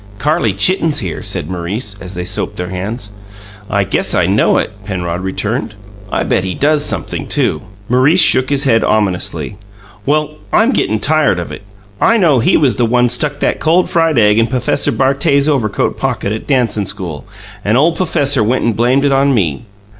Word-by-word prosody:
"Carrie 145 -2 +1
Chitten's 160 - +1
here," 95 - -3
said - - -3
Maurice, 95 +4 -4
as 90 0 -8
they 90 0 -4
soaped - - -2
their 90 0 -5
hands. 105 +4 -5 0.6
"I 100 -1 +1
guess 95 - -1
I - - +2
know - - +2
it," - - -1
Penrod 90 -3 -4
returned. 105 +4 -3 0.4
"I - - 0
bet 95 - 0
he 95 -1 -3
does 150 0 +1
sumpthing, - - -2
too." 75 - 0 0.3
Maurice 130 +9 +3
shook 130 -6 +4
his 140 -1 +1
head 115 -5 +2
ominously. 100 -1 -1 0.5
"Well, 150 +2 -1
I'm 230 +4 +3
gettin' 110 - 0
tired 150 - +2
of 85 - -5
it. - - -8 0.4
I 230 0 +4
know 160 - +3
he 115 - +3
was 140 -5 +2
the 120 - +2
one 125 +1 +2
stuck 145 +4 -1
that - - 0
cold 170 +3 +2
fried 165 -4 +2
egg 105 -1 +4
in 115 - +2
P'fesser 125 -1 0
Bartet's 140 +1 +2
overcoat 125 -9 0
pocket 100 - -2
at 110 - -5
dancin' 115 -7 0
school, 95 -5 -5 0.4
and 110 +4 +2
ole 160 +5 +3
p'fesser 140 -8 +1
went 120 +5 0
and 115 -2 0
blamed 125 +5 +2
it 140 - +2
on 135 0 +2
me. 80 - -1
120 Hz, 185 wpm, -14 LUFS, 100-145 Hz, 0.6 s, shook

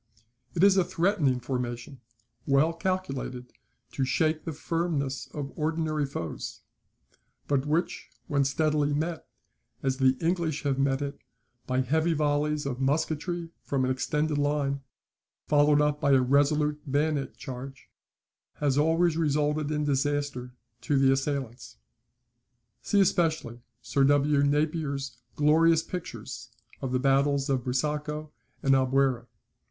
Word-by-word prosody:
It 175 - +2
is 195 -1 +6
a 190 - +5
threatening 165 -8 +1
formation, 125 +1 -4 0.5
well 145 +4 +3
calculated 140 -9 -3 0.4
to 135 - -1
shake 155 +4 0
the 165 - -3
firmness 155 -3 -2
of 140 -2 -6
ordinary 155 -1 -1
foes; 85 - -6 0.9
but 140 0 +1
which, 160 +4 -1 0.2
when 140 -1 +1
steadily 150 +1 +1
met, 160 +2 -3 0.6
as 135 -1 0
the 130 -1 +3
English 165 -3 -1
have 140 -2 0
met 135 0 +1
it, 140 0 -5 0.5
by 130 0 +1
heavy 160 +6 +1
volleys 150 0 0
of 135 -1 -3
musketry 160 +4 -1
from 135 -2 -1
an 130 - 0
extended 150 +3 0
line, 145 -1 0 0.6
followed 145 0 +4
up 150 0 +1
by 140 - +3
a 130 - +5
resolute 150 +3 +2
bayonet 145 0 0
charge, 135 0 -8 0.7
has 145 -1 +1
always 165 +2 +3
resulted 150 -1 +1
in 150 -1 -1
disaster 140 -3 -1 0.3
to 145 - +1
the 135 0 +5
assailants. 135 - -3 1.0
[See 205 - +1
especially 160 -10 +1 0.2
Sir 140 - +1
W. 145 0 +3
Napier's 145 -2 -1 0.2
glorious 160 +2 +4
pictures 180 -2 -7 0.3
of 130 - -3
the 130 - +2
battles 140 +1 +2
of 130 -2 0
Busaco 150 +4 -2 0.3
and 135 - +4
Albuera. 130 -2 +2
145 Hz, 125 wpm, -28 LUFS, 135-155 Hz, 1.0 s, is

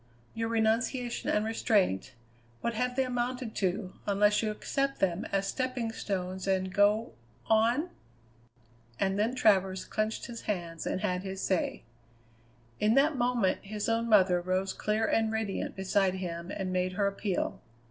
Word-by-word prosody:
Your 225 0 -2
renunciation 230 +2 0
and 210 +1 +2
restraint, 205 - +1 0.5
what 235 - -1
have 250 +2 -1
they 265 - +3
amounted 245 -2 -2
to, 190 0 -1
unless 205 +1 +3
you 220 - 0
accept 275 +6 -2
them 190 +1 0
as 195 0 -1
stepping 255 -1 -2
stones 190 -3 -3
and 190 -1 0
go 210 +3 +3 0.3
on?" 235 +10 +2 1.1
And 195 +1 +1
then 225 +4 +1
Travers 190 -5 +3
clenched 215 0 -2
his 235 -1 -7
hands 170 -5 -3
and 185 - -1
had 180 0 0
his 190 0 -5
say. 190 -2 -1 1.0
In 215 +2 +3
that 290 +3 +4
moment 240 -6 +1
his 210 +1 -4
own 230 0 +1
mother 185 -4 +5
rose 185 +2 -1
clear 215 +1 0
and 220 0 +2
radiant 220 -3 -2
beside 190 0 +1
him 170 -2 -5
and 190 -2 -3
made 185 0 0
her 200 +2 +1
appeal. 200 -1 -2
210 Hz, 150 wpm, -30 LUFS, 190-230 Hz, 1.1 s, mother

